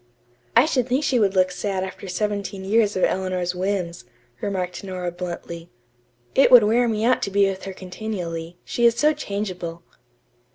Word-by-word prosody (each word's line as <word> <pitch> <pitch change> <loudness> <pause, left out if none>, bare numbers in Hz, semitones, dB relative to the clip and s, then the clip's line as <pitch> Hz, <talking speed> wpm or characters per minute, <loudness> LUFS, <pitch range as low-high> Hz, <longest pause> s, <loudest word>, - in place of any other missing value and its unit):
"I 235 +4 +7
should 255 -6 0
think 260 +4 +1
she 255 -4 +2
would 200 -2 +2
look 185 0 +3
sad 190 0 -2
after 190 +1 -7
seventeen 200 +1 -3
years 210 +1 +2
of 185 - 0
Eleanor's 185 -1 0
whims," 180 -6 -2 0.4
remarked 185 -3 -3
Nora 185 -2 -4
bluntly. 170 -1 -7 0.6
"It 275 - +5
would 245 -3 +9
wear 235 +3 +3
me 220 -1 -1
out 255 - +3
to - - -1
be 200 0 +3
with 195 -1 -4
her 195 - -5
continually, 180 -3 -6
she 240 0 +3
is 230 - +2
so 300 +5 +3
changeable." 185 - -5
195 Hz, 170 wpm, -23 LUFS, 180-220 Hz, 0.6 s, would